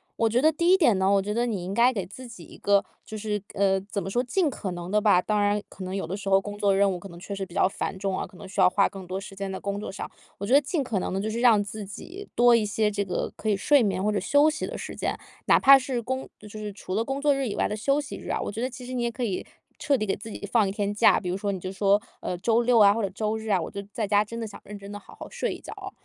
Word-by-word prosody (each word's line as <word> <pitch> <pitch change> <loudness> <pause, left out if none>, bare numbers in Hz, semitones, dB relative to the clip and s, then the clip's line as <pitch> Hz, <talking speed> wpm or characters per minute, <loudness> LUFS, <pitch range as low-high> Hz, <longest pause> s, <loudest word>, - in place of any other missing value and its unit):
我 230 - +2
觉 240 +3 +2
得 310 +2 +5
第 340 +3 +2
一 - - +8
点 300 - +4
呢， 190 0 +2
我 200 -1 +4
觉 210 +2 -3
得 240 +1 +1
你 210 -7 -2
应 180 - -5
该 240 +4 +4
给 200 -5 -2
自 225 +8 -10
己 220 -7 -11
一 - - -14
个， 200 0 +3 0.2
就 220 - -7
是 210 -1 -2
呃， 195 -1 +2
怎 200 +1 -4
么 195 - -5
说， 245 +5 0
尽 320 +6 +1
可 205 -7 -5
能 175 0 -6
的 210 0 +3
吧， 205 -4 +5
当 210 +2 0
然 205 0 +2
可 190 - -9
能 185 +1 -4
有 195 - -2
的 175 +4 -4
时 200 -1 -5
候 195 0 +5
工 205 +1 -7
作 200 -1 +3
任 200 0 +3
务， 180 - -4
可 195 - -10
能 170 -1 -11
确 200 - -7
实 195 -1 -4
比 180 -1 -14
较 200 - +4
繁 195 - -4
重 195 -1 -2
啊， - - -2
可 185 - -17
能 200 - -10
需 190 0 -1
要 180 - +7
花 195 +2 +3
更 195 -2 -9
多 185 +2 -3
时 195 0 -10
间 195 0 -4
在 190 - -5
工 200 0 -3
作 210 - -5
上。 195 - -6 0.3
我 200 - -4
觉 235 - 0
得 285 - +7
尽 295 +1 -1
可 230 -6 -1
能 - - -3
的 190 - -1
就 210 +2 -2
是 225 +2 -3
让 230 -4 +6
自 205 +1 -7
己， 360 - -9
多 240 0 +6
一 225 -2 +2
些 210 +1 +1
这 205 0 -1
个 185 -2 -3
可 220 - -3
以 205 - +2
睡 285 +7 +4
眠， 195 -4 0
或 210 - +2
者 205 - 0
休 285 +10 +4
息 310 0 -3
的 - - -6
时 - - -7
间， - - -2 0.3
哪 - - +6
怕 275 0 +9
是 255 -1 -2
工 260 +3 -4
就 210 - -12
就 215 +1 -9
是 210 -1 -5
除 195 -2 -7
了 220 +4 +1
工 270 +3 -3
作 290 0 +3
日 275 -1 -1
以 205 - -3
外 - - +1
的 210 - -3
休 275 +7 +1
息 290 -1 -6
日 - - -9
啊， - - 0
我 - - -3
觉 220 +3 -5
得 255 - 0
其 250 0 -10
实 255 - -6
你 250 - -1
也 235 - +1
可 250 +2 -5
以 200 -6 -2 0.4
彻 285 -2 +2
底 215 - -1
给 195 - 0
自 220 - -9
己 205 - -6
放 215 -5 +3
一 - - -2
天 205 0 -2
假。 205 - +5
比 180 - -5
如 180 - -1
说， 200 0 -2
你 190 - -4
就 185 +1 -5
说， 200 +1 +3 0.2
呃， 180 - -3
周 225 +5 +2
六 240 0 +3
啊 200 -1 +7
或 230 - -2
者 200 - -1
周 215 +3 -2
日 220 0 -8
啊， 195 -3 +3
我 165 - -5
就 200 - -5
在 210 +1 -2
家， 205 0 +4
真 230 +2 -7
的 230 - -3
想 210 - -10
认 210 +1 -8
真 200 0 -10
地 205 - -6
好 - - -16
好 - - -7
睡 - - -2
一 - - -9
觉 - - -9
哦， 390 -2 -8
205 Hz, 365 characters per minute, -26 LUFS, 195-235 Hz, 0.4 s, 怕